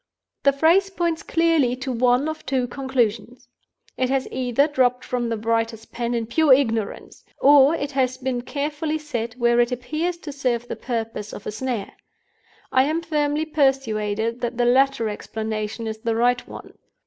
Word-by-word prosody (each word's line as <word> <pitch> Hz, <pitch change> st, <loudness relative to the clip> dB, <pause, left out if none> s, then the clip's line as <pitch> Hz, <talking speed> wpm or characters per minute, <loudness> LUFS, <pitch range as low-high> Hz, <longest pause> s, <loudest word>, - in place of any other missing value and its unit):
The 280 Hz, -, +5 dB
phrase 330 Hz, +8 st, +3 dB
points 340 Hz, -4 st, -1 dB
clearly 325 Hz, -7 st, +2 dB
to 260 Hz, +1 st, -4 dB
one 250 Hz, +3 st, +2 dB
of 315 Hz, 0 st, -5 dB
two 255 Hz, -1 st, +1 dB
conclusions. 245 Hz, -2 st, -2 dB, 0.5 s
It 255 Hz, -1 st, 0 dB
has 270 Hz, -1 st, 0 dB
either 255 Hz, +2 st, +1 dB
dropped 255 Hz, -4 st, +1 dB
from 245 Hz, -2 st, -2 dB
the 230 Hz, -, -1 dB
writer's 225 Hz, 0 st, -1 dB
pen 235 Hz, 0 st, -3 dB
in 230 Hz, -1 st, -1 dB
pure 305 Hz, +5 st, +2 dB
ignorance, 225 Hz, -6 st, -1 dB, 0.2 s
or 285 Hz, +2 st, +6 dB
it 285 Hz, -3 st, -3 dB
has 255 Hz, -2 st, 0 dB
been 255 Hz, -2 st, -2 dB
carefully 295 Hz, +4 st, -3 dB
set 240 Hz, -7 st, -4 dB
where 240 Hz, -1 st, +2 dB
it 240 Hz, +1 st, +3 dB
appears 310 Hz, +8 st, -2 dB
to 295 Hz, -, -4 dB
serve 250 Hz, -4 st, -1 dB
the -, -, -4 dB
purpose 225 Hz, -3 st, -4 dB
of 205 Hz, -, -9 dB
a -, -, -3 dB
snare. 240 Hz, -1 st, -4 dB, 0.8 s
I 260 Hz, 0 st, +4 dB
am 320 Hz, +3 st, -1 dB
firmly 300 Hz, -1 st, 0 dB
persuaded 235 Hz, -7 st, 0 dB
that 240 Hz, 0 st, -3 dB
the 245 Hz, -, +2 dB
latter 255 Hz, -1 st, +3 dB
explanation 220 Hz, +1 st, -4 dB
is 220 Hz, 0 st, -4 dB
the 230 Hz, 0 st, -1 dB
right 245 Hz, +2 st, +1 dB
one. -, -, -11 dB
250 Hz, 170 wpm, -23 LUFS, 230-285 Hz, 0.8 s, or